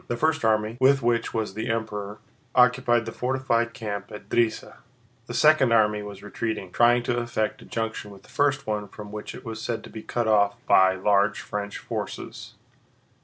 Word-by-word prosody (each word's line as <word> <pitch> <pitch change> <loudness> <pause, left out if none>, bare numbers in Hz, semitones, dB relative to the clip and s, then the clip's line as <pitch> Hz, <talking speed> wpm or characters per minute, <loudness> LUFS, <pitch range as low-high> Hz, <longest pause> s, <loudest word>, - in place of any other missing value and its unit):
The 120 - -2
first 160 +1 +1
army, 110 +1 +1
with 135 0 +5
which 115 0 +1
was 110 -3 -2
the 110 +3 -4
Emperor, 105 -2 -3 0.4
occupied 125 -2 +4
the 115 - -5
fortified 120 -2 0
camp 100 -2 -5
at 105 - -10
Drissa; 115 -2 0 0.5
the - - -6
second 150 -5 +5
army 105 -2 +3
was 100 -1 -9
retreating, 105 -2 -4
trying 120 +2 +4
to 120 0 -1
effect 115 -3 -2
a - - -13
junction 110 -2 -4
with 100 -1 -14
the - - -20
first 145 -1 +1
one 105 -1 -2
from 105 +1 -10
which 105 0 -7
it - - -11
was 110 -2 -6
said 115 -1 -3
to - - -11
be 110 - -7
cut 120 0 -2
off 100 -2 +3
by 95 0 +5
large 100 +2 +2
French 105 0 -5
forces. - - -6
110 Hz, 185 wpm, -25 LUFS, 105-120 Hz, 0.5 s, with